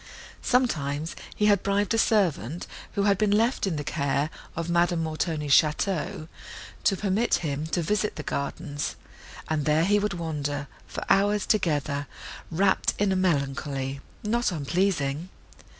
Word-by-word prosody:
Sometimes 160 - 0 0.2
he 210 - +1
had 205 -2 +4
bribed 200 +2 +1
a - - +2
servant, 175 - +1 0.3
who 200 - +1
had 200 -1 +3
been 215 -1 +3
left 220 +2 +2
in 180 - -1
the 150 - -3
care 140 0 0 0.2
of 165 0 -3
Madame 170 -1 +2
Montoni's 155 -2 -1
château, 155 0 +2 0.6
to 195 - +4
permit 210 +4 +2
him 145 +1 -2
to 170 +1 0
visit 210 +5 0
the 150 - -5
gardens, 145 +1 -3 0.5
and 155 -2 -1
there 155 +2 +3
he 205 +2 +4
would 210 0 -1
wander, 145 -4 -3 0.2
for - - -5
hours 205 +1 +3
together, 145 -7 0 0.4
rapt 190 +3 +2
in 205 -1 +2
a - - +2
melancholy, 140 -5 -1 0.2
not 235 +1 +1
unpleasing. 165 -1 0
170 Hz, 145 wpm, -26 LUFS, 145-200 Hz, 0.6 s, had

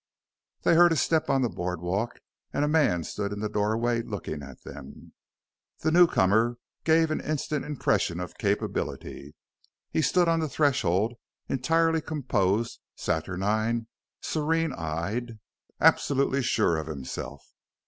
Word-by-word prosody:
They - - +4
heard 175 +1 +7
a - - +3
step 160 +1 +1
on 135 -1 +3
the - - +3
board 90 -2 -3
walk, 95 +7 -2 0.3
and 145 - +1
a - - 0
man 145 - +2
stood 100 +4 -4
in 105 - -4
the 105 - -1
doorway 110 +3 0
looking 100 -9 -5
at 70 -2 -11
them. 70 -1 -11 0.7
The 160 - +1
newcomer 120 - +4 0.3
gave 160 0 +3
an - - -1
instant 150 -1 -2
impression 105 - 0
of 90 -2 -7
capability. 70 +2 -3 0.6
He - - +1
stood 175 +4 +3
on 165 0 +3
the 160 -2 -1
threshold, 120 - +1 0.3
entirely 165 +5 +2
composed, 115 -8 0 0.2
saturnine, 105 +7 -1 0.4
serene 160 0 0
eyed, 100 +9 -3 0.4
absolutely 140 0 +3
sure 85 -8 +2
of 80 -1 -4
himself. 70 -1 -6
115 Hz, 135 wpm, -27 LUFS, 90-155 Hz, 0.7 s, heard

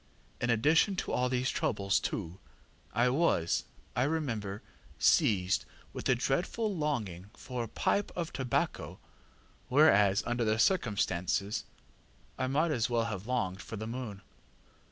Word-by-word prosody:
In 120 - -1
addition 150 - +3
to - - -3
all 125 0 +1
these 125 +1 0
troubles, 100 -1 +1
too, 85 +4 -4 0.5
I 120 +3 +3
was, 130 - +1 0.3
I - - +1
remember, 120 -9 -2 0.3
seized 95 -3 +3 0.3
with - - -3
a 125 - +5
dreadful 185 - -1
longing 110 - -2
for 125 -2 -4
a - - -5
pipe 200 - 0
of 170 -2 -3
tobacco, 130 -3 -1 0.7
whereas, 105 -9 +5
under 120 0 0
the 110 0 +1
circumstances, 105 - +1 0.7
I 130 - -1
might 155 +5 +1
as 120 -5 0
well 120 -1 +1
have 105 -2 -5
longed 105 -7 -1
for - - -7
the 110 - -5
moon. 115 -4 -6
120 Hz, 135 wpm, -31 LUFS, 100-140 Hz, 0.7 s, a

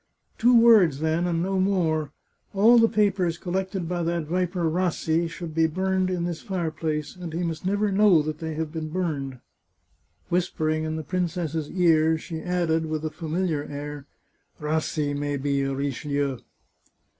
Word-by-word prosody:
" - - -43
Two 240 +1 +6
words 205 -11 +6
then, 160 +3 0
and 170 -1 0
no 190 +1 0
more. 165 -6 +1 0.4
All 230 +5 +6
the 230 0 +5
papers 195 -5 +1
col 175 0 -6
lected 190 -2 -2
by 175 0 -2
that 170 0 -1
viper 180 +2 -1
Rassi 165 -1 0
should 165 -1 -7
be 160 0 +3
burned 185 +2 0
in 180 -2 -1
this 170 -2 -3
fire 175 -5 -2
place, 150 -1 -3
and 175 -3 -7
he 170 +3 -2
must 165 +1 -3
never 205 +1 +1
know 195 -5 +5
they 155 +1 -4
have 160 -1 -3
been 160 -1 -4
burned." 145 -7 -3 0.9
Whispering 155 -3 0
in 155 0 -2
the 160 - -4
princess's 170 -3 -2
ear, 160 -3 +3
she 160 +1 -6
added, 165 -2 0
with 155 0 -3
a 155 - -2
famil 170 +3 -2
iar 150 -3 -2
air: 145 0 -6 0.3
" - - -41
Rassi 150 -1 -1
may 145 0 -2
be 140 0 0
a 135 0 -1
Richelieu." 140 -1 -2
165 Hz, 175 wpm, -25 LUFS, 155-180 Hz, 0.9 s, Two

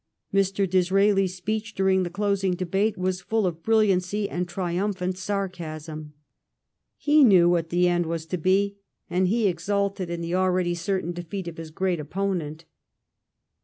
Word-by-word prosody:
Mr. 195 0 +2
Disraelis 190 +1 +2
speech 210 +3 -3
during 190 0 +3
the 180 - -2
closing 195 -1 0
debate 195 +4 0
was 185 0 -1
full 220 +1 0
of 170 -2 -2
brilliancy 205 -1 +2
and 180 -1 -3
triumphant 185 +1 -2
sarcasm. 165 -6 -5 0.8
He 300 0 +4
knew 185 -8 +6
what 170 -2 +1
the 180 +1 +3
end 175 -1 +1
was 165 -1 -3
to 180 +2 -3
be, 200 +3 +1 0.3
and 180 +1 +2
he 220 +2 +2
exulted 195 +1 -1
in 170 0 -4
the 170 +1 -3
already 185 -1 +1
certain 175 0 -2
defeat 175 +2 -6
of 170 - -7
his 165 -1 -7
great 180 +1 -1
opponent. 165 -1 -3
185 Hz, 150 wpm, -25 LUFS, 175-200 Hz, 0.8 s, knew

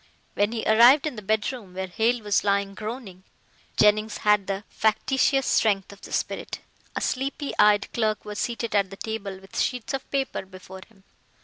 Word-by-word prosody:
When 205 +1 +1
he 230 -1 -3
arrived 240 +7 +6
in 305 - -3
the 215 - -7
bedroom 210 -1 -2
where 190 0 -2
Hale 225 +5 0
was 205 -1 +1
lying 200 -1 +1
groaning, 215 -3 -7 0.5
Jennings 210 +1 +3
had 210 -2 +4
the 195 +1 -3
factitious 265 +5 +1
strength 200 -3 +1
of 200 - -17
the - - -11
spirit. - - -3 0.4
A - - -2
sleepy 275 +2 -2
eyed 210 -1 +5
clerk 215 -2 0
was 210 0 -6
seated 235 -2 -2
at 200 -2 +2
the 195 - -10
table 205 -3 -5
with 195 0 -7
sheets 250 +1 -2
of 270 - -4
paper 270 -6 -2
before 190 0 -12
him. 200 -4 -24
215 Hz, 180 wpm, -25 LUFS, 200-235 Hz, 0.5 s, arrived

